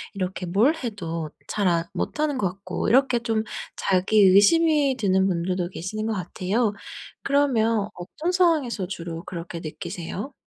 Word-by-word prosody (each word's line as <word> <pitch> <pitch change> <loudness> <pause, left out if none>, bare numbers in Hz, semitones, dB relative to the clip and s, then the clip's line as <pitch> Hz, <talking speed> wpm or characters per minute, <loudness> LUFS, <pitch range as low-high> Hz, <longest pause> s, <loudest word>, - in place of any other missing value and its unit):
이렇게 185 -1 -3
뭘 220 - +3
해도 170 - -4 0.2
잘 205 -2 0
안 170 -2 +2
못하는 300 -2 -1
거 195 - +2
같고 185 0 -4
이렇게 255 0 +4
좀 225 -2 -1 0.3
자기 190 +3 +2
의심이 280 - +5
드는 190 -4 +2
분들도 180 0 -1
계시는 215 +5 -4
거 225 - 0
같아요. 205 +3 -1 0.5
그러면 230 -7 +2
어떤 305 - -4
상황에서 310 - +2
주로 170 -2 -6
그렇게 170 -1 -6
느끼세요? 175 - -6
200 Hz, 305 characters per minute, -24 LUFS, 180-255 Hz, 0.5 s, 의심이